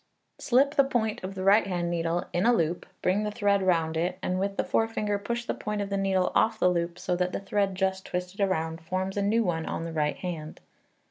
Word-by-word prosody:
Slip 275 Hz, +3 st, +3 dB
the 280 Hz, -3 st, +5 dB
point 235 Hz, -7 st, -1 dB
of 190 Hz, +1 st, -5 dB
the 185 Hz, -, -4 dB
right 200 Hz, +2 st, +5 dB
hand 175 Hz, -2 st, -1 dB
needle 170 Hz, 0 st, -1 dB
in 175 Hz, +6 st, +2 dB
a 240 Hz, -, +6 dB
loop, 170 Hz, -5 st, 0 dB, 0.2 s
bring 190 Hz, +3 st, +2 dB
the 210 Hz, -, -1 dB
thread 205 Hz, -2 st, +1 dB
round 165 Hz, -4 st, +1 dB
it, 175 Hz, +3 st, -1 dB
and 185 Hz, 0 st, 0 dB
with 195 Hz, +1 st, -2 dB
the -, -, +2 dB
forefinger 215 Hz, -2 st, 0 dB
push 235 Hz, +3 st, -3 dB
the -, -, -1 dB
point 210 Hz, 0 st, -4 dB
of 200 Hz, -1 st, -3 dB
the -, -, +1 dB
needle 190 Hz, -2 st, +1 dB
off -, -, +3 dB
the 180 Hz, -, +4 dB
loop 170 Hz, 0 st, -1 dB
so 180 Hz, 0 st, -1 dB
that 180 Hz, +1 st, -1 dB
the -, -, -1 dB
thread 195 Hz, -1 st, 0 dB
just 190 Hz, 0 st, -1 dB
twisted 180 Hz, +2 st, -4 dB
round 165 Hz, -4 st, 0 dB
forms 185 Hz, +3 st, -3 dB
a 205 Hz, -, 0 dB
new 220 Hz, +3 st, +2 dB
one 165 Hz, -4 st, -1 dB
on -, -, -3 dB
the 165 Hz, -1 st, -5 dB
right 150 Hz, -2 st, 0 dB
hand. 165 Hz, -4 st, -6 dB
190 Hz, 240 wpm, -27 LUFS, 175-205 Hz, 0.2 s, a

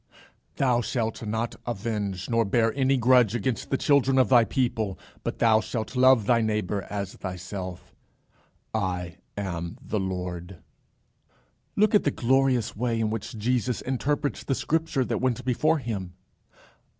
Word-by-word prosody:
"Thou 125 Hz, -3 st, +2 dB
shalt 115 Hz, -1 st, -2 dB
not 110 Hz, +2 st, -2 dB
avenge, 105 Hz, -4 st, -3 dB
nor 115 Hz, -1 st, +2 dB
bear 115 Hz, +2 st, +2 dB
any 135 Hz, 0 st, +2 dB
grudge 125 Hz, -2 st, +4 dB
against 120 Hz, +1 st, -2 dB
the 135 Hz, -, +1 dB
children 135 Hz, -2 st, +3 dB
of 130 Hz, -, +4 dB
thy 120 Hz, -3 st, +7 dB
people, 115 Hz, -3 st, -1 dB, 0.3 s
but -, -, -3 dB
thou 110 Hz, -1 st, +4 dB
shalt 110 Hz, +3 st, -4 dB
love 130 Hz, -3 st, +5 dB
thy 115 Hz, +1 st, +3 dB
neighbour 105 Hz, -2 st, -1 dB
as 100 Hz, -1 st, -4 dB
thyself: 90 Hz, 0 st, -7 dB, 0.8 s
I 90 Hz, -4 st, -2 dB, 0.2 s
am 85 Hz, -4 st, -4 dB
the 110 Hz, -, -3 dB
Lord." 90 Hz, -1 st, -4 dB, 1.2 s
Look 215 Hz, +1 st, +3 dB
at 210 Hz, -, +5 dB
the -, -, +2 dB
glorious 130 Hz, -2 st, +1 dB
way 115 Hz, 0 st, -1 dB
in 110 Hz, -1 st, 0 dB
which 110 Hz, 0 st, -5 dB
Jesus 125 Hz, +2 st, 0 dB
interprets 140 Hz, +3 st, -1 dB
the 135 Hz, -, 0 dB
scripture 160 Hz, -4 st, 0 dB
that 115 Hz, -2 st, -2 dB
went 125 Hz, -3 st, 0 dB
before 155 Hz, +6 st, +2 dB
him. 100 Hz, -, -4 dB
115 Hz, 145 wpm, -26 LUFS, 100-130 Hz, 1.2 s, thy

